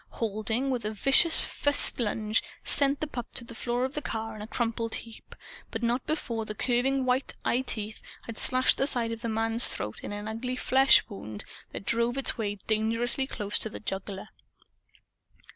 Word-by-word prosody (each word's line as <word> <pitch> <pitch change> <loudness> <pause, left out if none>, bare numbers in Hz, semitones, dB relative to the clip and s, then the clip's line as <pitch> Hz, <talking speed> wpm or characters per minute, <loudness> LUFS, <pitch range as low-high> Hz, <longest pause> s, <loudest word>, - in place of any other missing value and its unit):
Halding, 225 +4 -1
with 250 -2 -2
a 210 - -2
vicious 275 - +6
fist 285 -2 +3
lunge, 215 -1 0 0.2
sent 280 0 +1
the - - 0
pup 245 -5 -6
to - - +1
the 235 - -10
floor 240 +2 -1
of 265 - -5
the 300 - -3
car 225 -4 -4
in 215 - -9
a 210 - -7
crumpled 230 -1 -2
heap, 230 -1 -10 0.3
but 225 0 -5
not 240 +2 0
before 235 -7 -2
the 215 -1 -7
curving 260 +3 +1
white 255 +1 0
eyeteeth 220 -4 -2 0.2
had 230 - -8
slashed 255 0 +3
the 270 - +3
side 235 -5 +2
of 230 0 -6
the 230 - -3
man's 225 +1 +5
throat 105 +2 -4
in - - -6
an 205 +1 -5
ugly 240 +3 -4
flesh 265 +1 +5
wound 110 - -8 0.3
that - - -7
drove 235 +2 +1
its 275 - +1
way 205 -3 -2
dangerously 230 +4 0
close 210 -5 -3
to 220 - -2
the - - -8
jugular. 195 0 -5
230 Hz, 185 wpm, -28 LUFS, 215-255 Hz, 0.3 s, vicious